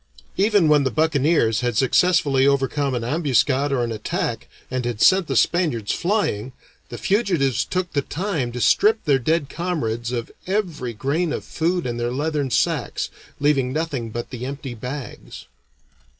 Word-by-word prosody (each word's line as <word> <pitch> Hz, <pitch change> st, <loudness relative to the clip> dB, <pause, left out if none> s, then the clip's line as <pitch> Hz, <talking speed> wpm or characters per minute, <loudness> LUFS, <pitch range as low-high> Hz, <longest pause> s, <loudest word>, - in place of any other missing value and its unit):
Even 205 Hz, -3 st, +3 dB
when 150 Hz, -2 st, +4 dB
the 130 Hz, -, +1 dB
buccaneers 150 Hz, -6 st, +2 dB
had 120 Hz, -3 st, -1 dB
successfully 140 Hz, -1 st, +3 dB
overcome 140 Hz, 0 st, +1 dB
an 120 Hz, -, -2 dB
ambuscade 140 Hz, 0 st, +1 dB
or 130 Hz, -3 st, +1 dB
an 115 Hz, -, -2 dB
attack, 110 Hz, -1 st, -3 dB, 0.2 s
and 130 Hz, -1 st, -1 dB
had 120 Hz, -3 st, -3 dB
sent 190 Hz, -, +5 dB
the 135 Hz, -, -2 dB
Spaniards 135 Hz, -, +1 dB
flying, 170 Hz, -, -1 dB, 0.4 s
the 120 Hz, -, -7 dB
fugitives 175 Hz, -, +1 dB
took 180 Hz, -1 st, -3 dB
the 145 Hz, -, +1 dB
time 150 Hz, -5 st, -3 dB
to 125 Hz, -, -5 dB
strip 210 Hz, -, +3 dB
their 140 Hz, -4 st, +3 dB
dead 155 Hz, +3 st, 0 dB
comrades 125 Hz, -10 st, -3 dB
of 120 Hz, -2 st, -4 dB, 0.2 s
every 175 Hz, -, -2 dB
grain 150 Hz, +8 st, -1 dB
of -, -, -3 dB
food 175 Hz, +2 st, -1 dB
in 120 Hz, -1 st, -3 dB
their 120 Hz, 0 st, -1 dB
leathern 145 Hz, +1 st, -1 dB
sacks, -, -, 0 dB, 0.3 s
leaving 140 Hz, -3 st, +2 dB
nothing 140 Hz, -6 st, -2 dB
but 120 Hz, +2 st, -6 dB
the 125 Hz, -2 st, -6 dB
empty 135 Hz, -1 st, -5 dB
bags. 125 Hz, -, -8 dB
140 Hz, 160 wpm, -22 LUFS, 120-165 Hz, 0.4 s, sent